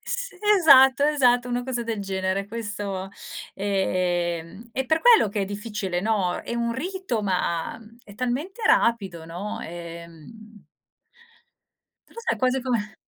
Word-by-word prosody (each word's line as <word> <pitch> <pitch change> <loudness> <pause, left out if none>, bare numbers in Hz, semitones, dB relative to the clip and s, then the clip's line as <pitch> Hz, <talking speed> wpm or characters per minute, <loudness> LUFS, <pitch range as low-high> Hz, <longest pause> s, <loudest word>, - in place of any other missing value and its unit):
Sì, - - -4 0.2
esatto, 275 -4 +7
esatto, 250 -5 +3
una 245 0 -1
cosa 245 -1 -3
del 230 -2 -3
genere. 190 0 -2
Questo, 205 -3 -5 0.4
ehm 185 0 -1
è 265 - -1
per 315 +5 +2
quello 470 - +6
che 205 +1 -2
è - - 0
difficile, 205 -3 -3
no. 195 -4 0
È - - -5
un 235 0 -1
rito, 360 - -3
ma 180 -4 -1 0.2
è 205 - -14
talmente 275 - -3
rapido, 200 - +2
no, 180 +6 -6
ehm 170 +5 -10 1.4
Però, - - -14
sai, 460 - 0
è - - -15
quasi 255 0 +1
come 225 -4 -2
215 Hz, 135 wpm, -24 LUFS, 190-255 Hz, 1.4 s, esatto